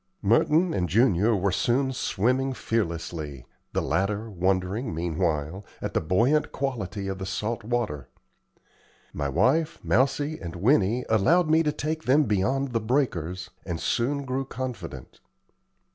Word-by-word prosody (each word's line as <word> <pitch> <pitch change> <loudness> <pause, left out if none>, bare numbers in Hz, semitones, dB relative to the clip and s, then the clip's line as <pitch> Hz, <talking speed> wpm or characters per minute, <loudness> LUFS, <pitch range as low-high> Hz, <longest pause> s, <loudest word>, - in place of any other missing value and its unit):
Merton 150 - +3
and 90 -2 -1
Junior 110 - +3
were 100 0 +1
soon 130 +7 +1
swimming 130 +4 0
fearlessly, 85 - -3 0.3
the - - 0
latter 105 +3 -1
wondering, 95 +3 -1
meanwhile, 85 +1 -1 0.2
at - - -4
the - - +1
buoyant 115 - +2
quality 115 -7 -3
of 95 -1 -4
the 95 - -4
salt 105 +4 -3
water. 110 - -2 1.0
My 70 -1 -2
wife, 140 - +2
Mousie, 135 - +1
and 85 -2 -7
Winnie 110 - +2
allowed 155 - +3
me 160 +1 +5
to 150 -2 +1
take 155 +2 -3
them 140 +4 +5
beyond 130 +5 0
the 115 - +1
breakers, 95 - -1
and 85 -3 -4
soon 140 +8 0
grew 130 +1 -1
confident. 115 - -7
110 Hz, 135 wpm, -26 LUFS, 90-135 Hz, 1.0 s, me